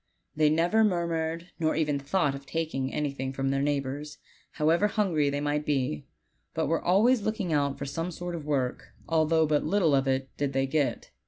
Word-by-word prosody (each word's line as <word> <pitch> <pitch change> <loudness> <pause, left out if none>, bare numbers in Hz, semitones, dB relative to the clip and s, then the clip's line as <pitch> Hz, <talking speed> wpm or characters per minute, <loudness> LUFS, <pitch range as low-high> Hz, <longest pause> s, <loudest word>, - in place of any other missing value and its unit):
They 155 0 +4
never 170 +8 +3
murmured, 170 -3 -1
nor 160 -1 +1
ever 150 -2 0
thought 145 +1 0
of 140 0 -9
taking 155 -5 -2
any 150 -2 -1
thing 135 -1 -4
from 135 0 -1
their 135 0 0
neighbors, 145 +1 -2 0.4
however 165 +6 +3
hungry 180 -9 +1
they 145 0 -2
might 145 0 0
be, 130 - -1 0.5
but - - 0
were 165 +3 0
always 215 +7 +4
looking 200 -5 -2
out 140 -2 +1
for 140 - -5
some 165 +5 -3
sort 175 0 -6
of 165 -3 -5
work, 135 -4 -2
although 160 0 +3
but 150 -1 +1
little 170 -2 +2
of 135 0 +3
that 130 0 -1
did 140 -1 -1
they 135 0 +1
get. 145 0 -1
150 Hz, 190 wpm, -28 LUFS, 140-165 Hz, 0.5 s, They